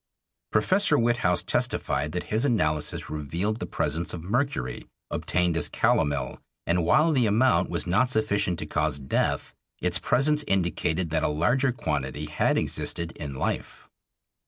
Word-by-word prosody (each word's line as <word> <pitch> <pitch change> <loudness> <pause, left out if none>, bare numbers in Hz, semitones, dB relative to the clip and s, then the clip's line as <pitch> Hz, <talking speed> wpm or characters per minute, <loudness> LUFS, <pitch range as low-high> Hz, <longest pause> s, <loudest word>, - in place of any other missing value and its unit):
Professor 190 -5 +3
Witthaus 115 -7 +2
testified 70 +3 0
that 90 - -3
his 110 +3 +2
analysis 80 - 0
revealed 85 - -2
the - - -4
presence 80 +3 -2
of 80 - -8
mercury, 110 - -2 0.2
obtained 90 -2 0
as 80 - +1
calomel, 70 -4 0 0.3
and 85 0 +1
while 155 - +4
the 130 -6 +3
amount 105 -4 +3
was - - 0
not 95 +8 +2
sufficient 105 -6 +1
to - - -4
cause - - 0
death, 65 -2 -1 0.3
its 90 -1 0
presence 150 - +2
indicated 85 -2 0
that 80 -1 +1
a - - +1
larger 120 - +2
quantity 75 - -3
had 75 0 +1
existed 85 -1 -2
in 70 -4 -7
life. - - -4
90 Hz, 145 wpm, -26 LUFS, 75-120 Hz, 0.3 s, while